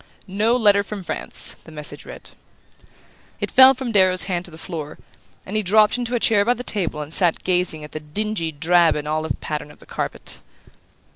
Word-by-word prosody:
"No 210 +5 +1
letter 205 -4 +4
from 200 -1 -7
France," - - 0
the 160 - -14
message 150 -1 -5
read. - - -11 1.1
It - - -4
fell 265 +1 +7
from 255 -2 -5
Darrow's 185 -3 +3
hand 180 -2 -3
to - - -8
the 160 - -13
floor, 160 -3 -7 0.5
and 200 - -7
he 215 - +2
dropped 210 +2 +4
into 245 0 -3
a - - 0
chair 210 -3 +3
by 245 +3 +1
the 250 - -7
table 180 -10 -2
and 150 +2 -7
sat 175 -3 +2
gazing 180 -4 +1
at 150 - -10
the 155 - -6
dingy 170 +2 -3
drab 165 +2 +3
and 150 0 -5
olive 155 +1 -2
pattern 150 -1 -5
of 150 - -16
the - - -18
carpet. - - -6
185 Hz, 200 wpm, -21 LUFS, 160-215 Hz, 1.1 s, fell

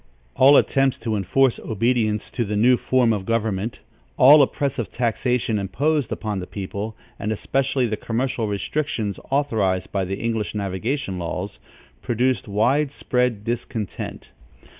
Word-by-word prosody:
All 140 +2 +7
attempts 135 -1 +2
to 110 -2 -2
enforce 125 +6 +2
obedience 110 -1 0
to 120 - -1
the 105 -1 -3
new 120 +5 +5
form 125 -2 +2
of 100 -3 -3
government, 110 0 -2 0.4
all 145 +4 +8
oppressive 135 -3 -1
taxation 120 -2 0
imposed 145 +7 0
upon 105 -3 -3
the 90 - -6
people, 100 +2 -5 0.2
and 105 - -2
especially 135 +4 0
the 110 -2 -2
commercial 115 -1 -2
restrictions 105 0 -2
authorized 110 -10 0
by 95 -2 -1
the 95 +2 -3
English 115 -2 -2
navigation 100 +2 -2
laws, 90 +4 -4 0.4
produced 125 +2 0
wide 135 +8 +2
spread 125 -6 -1
discontent. 115 - -5
115 Hz, 135 wpm, -22 LUFS, 105-130 Hz, 0.4 s, all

